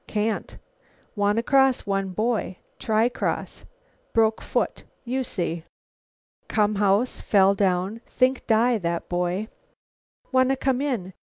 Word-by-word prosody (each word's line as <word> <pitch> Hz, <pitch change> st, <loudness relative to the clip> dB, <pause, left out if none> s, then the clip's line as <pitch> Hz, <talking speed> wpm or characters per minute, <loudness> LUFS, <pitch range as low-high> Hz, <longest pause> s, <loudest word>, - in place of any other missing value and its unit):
Can't. 215 Hz, 0 st, -2 dB, 0.6 s
Wanna 205 Hz, +2 st, +1 dB
cross, 270 Hz, -1 st, +3 dB
one 195 Hz, -1 st, -1 dB
boy. 215 Hz, -1 st, -1 dB, 0.2 s
Try 220 Hz, +1 st, +2 dB
cross. 245 Hz, -, -3 dB, 0.5 s
Broke 220 Hz, -1 st, +2 dB
foot. -, -, -2 dB, 0.2 s
You 260 Hz, +2 st, -1 dB
see. 170 Hz, -7 st, -3 dB, 0.8 s
Come 210 Hz, -1 st, +1 dB
house. 205 Hz, +4 st, +1 dB
Fell 195 Hz, -1 st, +4 dB
down. 195 Hz, +2 st, 0 dB
Think 255 Hz, 0 st, +1 dB
die, 230 Hz, +1 st, +3 dB
that 170 Hz, -2 st, -3 dB
boy. 180 Hz, +4 st, -1 dB, 0.8 s
Wanna 260 Hz, 0 st, +3 dB
come 265 Hz, -1 st, 0 dB
in. 230 Hz, -10 st, -2 dB
215 Hz, 120 wpm, -24 LUFS, 195-245 Hz, 0.8 s, Fell